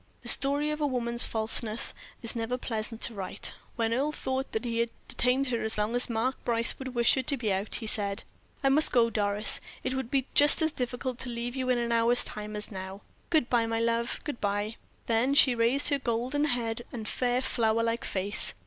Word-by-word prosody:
The - - -2
story 285 +2 +2
of 300 - -4
woman's 245 -5 +3
falseness 220 0 +1 0.3
is 230 - -2
never 235 +2 -2
pleasant 225 -2 -4
to 235 - -1
write. 195 -3 -4 0.2
When 230 -1 0
Earle 280 +5 0
thought 265 -1 -3
that 220 +2 -3
he 230 -1 -2
had 235 0 +1 0.2
detained 255 +2 +1
her 235 -2 -1
as 220 0 0
long 210 +2 -1
as 245 - +3
Mark 235 +3 -2
Brace 230 -1 +2
would 260 -1 -7
wish 235 0 +4
her 265 - +1
to 275 +2 0
be 220 -5 -1
out, 195 +3 -3
he 230 - -4
said: 200 -2 -1 0.4
"I 270 - +4
must 300 +3 +7
go, 230 -2 +3
Doris; 205 -1 +1 0.2
it 260 - -2
would 265 -3 -4
be 270 -1 0
just 290 +3 +6
as 315 - +2
difficult 250 -1 -4
to 255 - -4
leave 240 +1 -5
you 260 -1 -2
in 250 - +2
an 235 0 -2
hour's 235 +1 +3
time 210 0 -7
as 210 +1 -5
now. 190 0 -7 0.3
Good 315 -7 +2
bye, 235 -2 +1
my 225 0 -1
love, 230 0 -1
good 295 -5 -6
bye." 205 +2 -2 0.3
Then 240 +4 +1
she 265 -3 +7
raised 240 +5 +3
her 285 -1 0
golden 255 +4 -1
head 240 -4 -1
and 225 -4 -6
fair, 245 +1 0
flower 230 -3 0
like 230 0 -1
face. 200 +2 0
235 Hz, 215 wpm, -28 LUFS, 225-260 Hz, 0.4 s, must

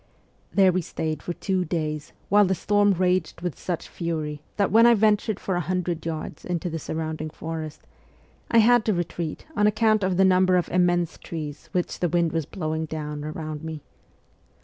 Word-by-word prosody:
There 190 -2 +5
we 185 +1 0
stayed 155 -2 -3
for 175 - -4
two 185 0 -1
days 155 -3 -3 0.2
while 205 +1 +6
the 190 0 +1
storm 205 +3 +3
raged 180 -2 0
with 175 -3 -4
such 175 -3 -3
fury 155 -4 -3 0.2
that 200 -3 +2
when 230 +3 +7
I 235 - +7
ventured 215 -1 +2
for 190 - -2
a 175 - +1
few 155 - -8
hundred 180 -3 -1
yards 160 -1 -5
into 175 0 -2
the 165 - -3
surrounding 155 0 -4
forest, 160 -1 -6 0.7
I 230 - +3
had 235 +1 +6
to 215 - +2
retreat 170 -2 -4
on 210 - +4
account 215 0 +3
of 185 -1 +1
the 190 - +5
number 185 0 +4
of 175 - 0
immense 175 -1 +1
trees 150 -3 -7
which 180 -1 -2
the 175 - +1
wind 170 -1 +2
was 165 -3 -2
blowing 160 -4 -3
down 150 -1 -5
round 155 0 -5
me. 160 -2 -6
175 Hz, 190 wpm, -25 LUFS, 155-190 Hz, 0.7 s, when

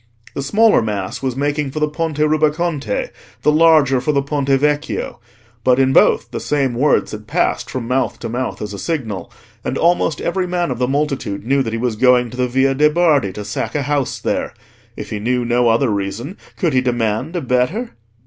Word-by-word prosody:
The - - -3
smaller 210 - +4
mass 105 -4 -3
was 130 -2 -2
making 145 +1 -1
for 155 - -5
the 150 - +2
Ponte 155 0 -3
Rubaconte, 155 -4 0 0.3
the 150 - +4
larger 150 -5 +4
for 150 - 0
the 140 -1 +1
Ponte 140 -1 -2
Vecchio; 145 +2 0 0.4
but 125 -1 +4
in 135 0 +3
both 115 -2 +3
the 115 - -4
same 140 -4 0
words 140 +5 +2
had 105 0 -8
passed - - 0
from 125 -3 -4
mouth 125 -2 0
to 115 - -6
mouth 125 0 -3
as 105 0 -6
a 100 - -6
signal, 110 - -4 0.3
and - - -2
almost 170 -2 +2
every 180 +1 -1
man 175 -4 -1
of 125 - -4
the 125 - +1
multitude 135 -8 -2
knew 135 +3 +2
that 115 -4 -3
he - - -1
was 120 -1 -1
going 125 0 +3
to 125 - -9
the 125 0 +1
Via 130 +2 +2
de' 150 +3 +4
Bardi 150 - +2
to 105 +1 -7
sack 105 - -4
a 145 - 0
house 145 -1 -1
there. - - -2 0.4
If - - -7
he 105 - -3
knew 125 +3 0
no 120 0 +2
other 115 +2 +2
reason, 100 - -3 0.2
could 170 -6 0
he 130 - +3
demand 120 - -1
a 175 - -1
better? 130 - 0
135 Hz, 205 wpm, -18 LUFS, 120-150 Hz, 0.4 s, smaller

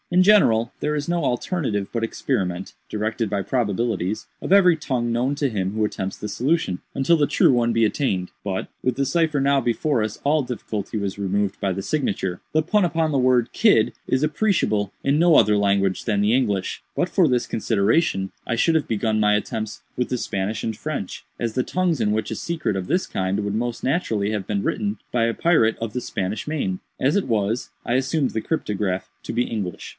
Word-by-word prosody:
In 180 +1 +4
general, 120 - +4
there 150 0 0
is 145 -1 -3
no 170 0 0
alternative 120 - -1
but 115 -1 -1
experiment 95 -6 -2 0.2
(directed 110 +1 -2
by 100 -1 -1
probabilities) 105 -3 -1
of - - -5
every 185 -3 +6
tongue 125 -6 -2
known 125 +4 0
to 140 0 0
him 95 -6 -2
who 110 +1 0
attempts 95 -2 -4
the 105 - -5
solution, 130 - 0
until 135 +5 +3
the 150 -3 +2
true - - +4
one 120 -1 +2
be 115 -1 +3
attained. 95 -7 -1
But, 95 -2 -3 0.2
with 130 -1 +1
the 140 +2 0
cipher 155 +1 +1
now 140 0 +3
before 120 +1 +1
us, 110 -1 -4
all 150 +2 +3
difficulty 115 -5 -4
was 100 -1 -3
removed 100 0 0
by 100 - +1
the 95 +1 -3
signature. 95 -10 -1
The 155 0 +2
pun 205 +5 +2
upon 165 -2 +1
the 135 - +2
word 125 -2 +2
'Kidd' - - +4
is 130 - +1
appreciable 150 - +1
in 140 +1 +2
no 170 0 +5
other 105 -4 +5
language 100 -2 +1
than 100 - 0
the 105 +2 +3
English. 105 -7 0
But 180 - 0
for 180 -1 +3
this 125 -1 +1
consideration 105 - +1
I 120 - -1
should 160 +7 +2
have 155 - 0
begun 110 0 0
my 105 0 +4
attempts 110 +1 -3
with 125 - -1
the 125 - 0
Spanish 100 -1 -2
and 110 - -2
French, 140 -6 -5 0.2
as 115 -2 -2
the 130 - +1
tongues 175 -3 0
in 105 - +2
which 110 +1 -1
a - - -2
secret 160 - -2
of 95 -1 -3
this 185 - 0
kind 95 +1 -1
would 100 0 -2
most 120 +1 -2
naturally 115 - 0
have 105 -3 -3
been 100 -1 -1
written 205 0 -1 0.2
by 120 -2 +3
a 115 - 0
pirate 135 -10 +3
of 115 -2 -4
the 125 - -2
Spanish 100 +1 -3
main. 100 -12 -2 0.2
As 140 +7 +2
it 200 - +1
was, 110 +1 0 0.2
I 120 - 0
assumed 135 +2 +1
the 110 - -2
cryptograph 105 - -2
to - - -5
be 120 +1 +1
English. 100 -8 -4
115 Hz, 210 wpm, -23 LUFS, 100-145 Hz, 0.2 s, every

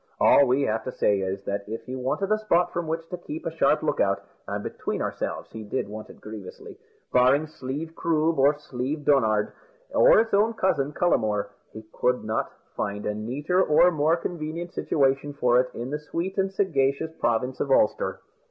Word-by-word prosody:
All 140 - +6
we 130 +3 +2
have 110 -3 0
to 130 - -3
say 100 -4 +1
is, 95 +1 -3
that 100 0 -3
if 115 - -5
he 130 - -6
wanted 135 +11 -2
a 215 - +3
spot 180 -5 +2
from 175 -2 -2
which 165 +1 -3
to 180 - -5
keep 160 -2 -7
a 165 - -2
sharp - - +3
look - - 0
out - - +1 0.2
and, - - -3
between - - -4
ourselves, - - -4
he 110 - -7
did 105 - -3
want 105 +1 -8
it - - -14
grievously 105 -3 -9 0.4
barring 130 +5 +4
Slieve 155 +2 -6
Croob, 160 -1 +1
or 140 +2 +5
Slieve 145 +1 -4
Donard, 110 -7 +3 0.4
or - - +6
its 225 -1 0
own 215 +3 +3
cousin, 145 -9 +1
Cullamore, 110 -12 +1 0.2
he 110 - -9
could 125 0 +1
not 110 +1 -2 0.2
find 100 0 -3
a 105 - 0
neater 140 - 0
or 175 +1 +5
more 160 +1 +2
convenient 170 +1 -5
situation 135 0 +1
for 125 -3 +3
it 125 0 +1
in 120 +3 -5
the 150 - -2
sweet 170 +5 -4
and 195 0 +1
sagacious 160 -5 0
province 125 +3 0
of 140 - -1
Ulster. 110 -5 +2
140 Hz, 190 wpm, -25 LUFS, 120-165 Hz, 0.4 s, All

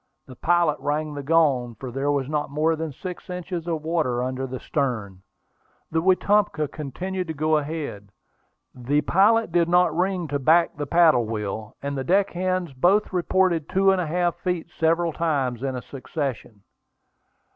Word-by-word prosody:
The 130 - -12
pilot 170 0 +2
rang 150 +1 -2
the 145 - -5
gong, 140 -6 +2
for 125 +3 -7
there 135 +3 -1
was 140 -2 -1
not 150 -1 -2
more 155 +3 +1
than 160 -1 -4
six 180 +7 -8
inches 180 -1 -5
of 160 -3 -2
water 155 -7 0
under 130 +1 -3
the 130 0 -6
stern. 110 -10 -3 0.7
The 160 0 +1
Wetumpka 185 -4 +2
continued 180 +6 -4
to 160 - -4
go 155 +1 +2
ahead. 145 -9 -5 0.6
The 135 +4 0
pilot 215 +4 +3
did 170 0 +2
not 175 -2 +3
ring 180 -1 0
to 145 0 -1
back 165 +5 +3
the 145 -1 -4
paddle 160 -7 +4
wheel, 110 0 -4
and 140 0 -3
the 135 - -2
deck 190 +6 +2
hands 185 -3 -2
both 190 +11 +2
reported 180 -3 +1
two 195 +1 +1
feet - - +7
and 190 -1 +1
a 170 - -3
half, 175 +2 0 0.4
several 165 0 +2
times 135 -8 -1
in 130 -2 -2
succession. 130 -6 -5
155 Hz, 170 wpm, -24 LUFS, 135-175 Hz, 0.7 s, feet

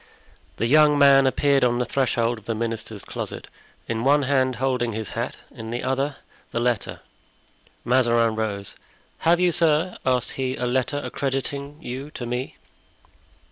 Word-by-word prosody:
The - - 0
young 150 +3 +5
man 140 -1 +6
appeared 140 0 +2
on 120 -1 +3
the 125 - 0
threshold 120 -4 0
of 105 - -23
the 115 - -2
minister's 110 -2 -4
closet, - - -6 0.4
in 115 0 -2
one 145 +2 +4
hand 130 -2 +1
holding 125 -2 0
his 110 -1 -4
hat, - - -4
in 110 0 -8
the 120 +1 -3
other 135 +2 -1 0.3
the 115 - -2
letter. 120 -2 -1 0.8
Mazarin 120 -2 +3
rose. 105 -3 -3 0.5
"Have 170 +1 +3
you, 180 -1 +3
sir," 165 +2 +2
asked 125 -2 +1
he, 130 -1 -2
"a 125 - -3
letter 130 +3 0
accrediting 140 +1 -3
you 130 +4 -5
to 120 - -5
me?" 125 +2 -4
130 Hz, 155 wpm, -24 LUFS, 115-140 Hz, 0.8 s, man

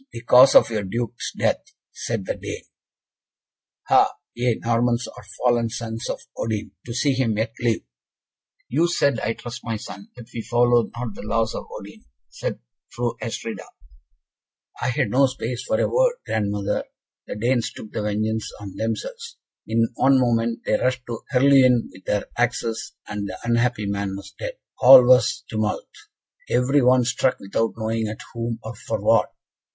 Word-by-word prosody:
'The 115 - -7
cause 125 +3 +7
of - - +7
your 110 -2 -1
Duke's 115 +4 -4
death!' - - -1 0.2
said 115 -5 -4
the - - -1
Dane. - - -7 1.2
'Ha, - - +5 0.2
ye 120 -1 +1
Normans 120 +1 +1
are - - -12
fallen 120 -2 +2
sons 115 0 -5
of - - -3 0.2
Odin, 110 -3 -3 0.2
to - - -5
see 140 +2 +2
him 120 -5 0
yet 110 +1 -1
live!'" 115 -2 0 0.8
"You 160 +7 +2
said, 140 -8 +1
I 110 +2 -1
trust, 120 +2 -8
my 115 -1 -2
son, 100 -1 -10
that 120 -2 -11
we 115 - -3
follow 120 0 +3
not 120 -3 -4
the - - -9
laws 110 +1 0
of - - -6
Odin?" - - -10 0.3
said - - -4 0.3
Fru 120 -1 -2
Astrida. 115 0 -4 1.2
"I 125 - 0
had 125 -4 0
no 135 +2 +5
space 125 -1 -4
for 275 - 0
a - - +2
word, - - +3
grandmother; 100 -2 -1 0.4
the - - -5
Danes 120 +2 0
took 110 - -10
the - - -3
vengeance 110 +1 -1
on 100 -2 -8
themselves. 465 - -4 0.3
In 115 +1 +2
one 135 +3 +4
moment 115 -2 +1
they - - +2
rushed 130 0 0
on 115 -1 -3
Herluin 130 -3 +5
with 95 - -16
their 105 -1 0
axes, 120 +4 -1
and 105 -1 -4
the 95 - -6
unhappy 120 -2 +1
man 100 -1 -2
was 100 - -10
dead. - - -5 0.2
All 130 0 +10
was 125 -1 +4
tumult; 110 -1 -2 0.6
every 130 +4 +3
one 125 0 +5
struck 125 +1 +1
without 110 +3 -1
knowing 110 0 -1
at 110 +1 -6
whom, 115 -1 -3
or 110 +2 -7
for 110 - -4
what. - - +3
115 Hz, 165 wpm, -23 LUFS, 110-125 Hz, 1.2 s, All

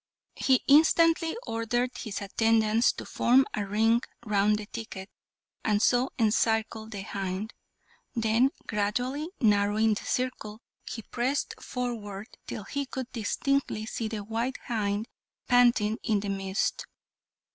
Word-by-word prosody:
He 260 -2 +3
instantly 325 +4 +5
ordered 240 +2 -1
his 215 -3 -5
attendants 225 +3 +3
to - - -8
form 260 +3 +4
a 205 -1 -2
ring 225 +3 +3 0.2
round 210 0 +3
the 210 - -6
thicket, 205 -3 -8 0.5
and 210 -1 +2
so 245 +4 +3
encircle 220 -1 +1
the 200 -4 -6
hind; 195 +3 -4 0.6
then, 230 +3 +3 0.2
gradually 245 +9 -1
narrowing 210 -1 +3
the 210 - -5
circle, 235 -4 -2 0.3
he 225 - -6
pressed 255 +6 -1
forward 220 -5 -5 0.2
till - - -5
he 280 +6 -3
could 260 -1 -5
distinctly 240 0 -1
see 225 0 -3
the 215 -2 -4
white 230 +5 -2
hind 215 -2 -1 0.4
panting 240 -3 +4
in 215 -3 +1
the 205 - -4
midst. 195 0 -1
225 Hz, 125 wpm, -28 LUFS, 210-245 Hz, 0.6 s, instantly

